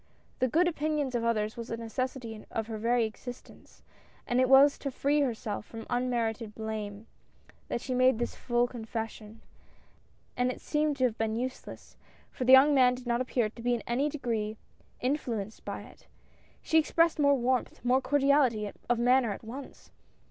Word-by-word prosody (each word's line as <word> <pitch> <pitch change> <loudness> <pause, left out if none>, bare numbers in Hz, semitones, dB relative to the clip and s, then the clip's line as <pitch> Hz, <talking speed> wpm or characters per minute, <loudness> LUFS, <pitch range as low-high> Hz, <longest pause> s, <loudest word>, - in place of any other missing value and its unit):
The 255 - +3
good 335 +8 +3
opinions 300 -4 -1
of 240 -1 -1
others 215 -2 0
was 235 -1 -7
a 230 - -3
necessity 230 -1 -4
of 225 - -3
her 220 -1 -6
very 235 +1 +2
existence, 245 +3 -10 0.4
and 245 - +1
it 255 - +2
was 275 +2 +6
to 280 - -3
free 285 +3 +1
her 255 -5 +1
self 210 -2 -5
from 225 +1 -9
unmerited 235 -3 -1
blame, 215 -1 -5 0.6
that 235 - -3
she 255 - -3
had 250 - 0
made 255 -2 +5
this 240 +1 -2
full 240 -1 +1
confession, 225 -2 -6 0.9
and 250 0 +1
it - - -8
seemed 300 -1 0
to 260 - 0
have 240 -3 +1
been 220 0 0
useless, 255 +2 -6 0.3
for 255 - -4
the 255 - +5
young 270 +3 +8
man 250 -2 +5
did 250 0 -11
not 240 0 0
appear 250 -3 0
to 230 - -12
be 245 +1 +1
in 235 - -5
any 265 +5 0
degree 225 -7 -3 0.5
influ 250 -6 -1
enced 215 - -17
by - - -5
it. - - -17 0.6
She 320 - +4
expected 330 0 +2
more 280 -1 +5
warmth, 250 0 -1
more 255 +2 +3
cordi 280 +1 +1
ality 230 -8 +2 0.2
of 240 - +3
manner 245 -1 +3
at - - -10
once. 260 +5 -10
245 Hz, 185 wpm, -29 LUFS, 225-265 Hz, 0.9 s, young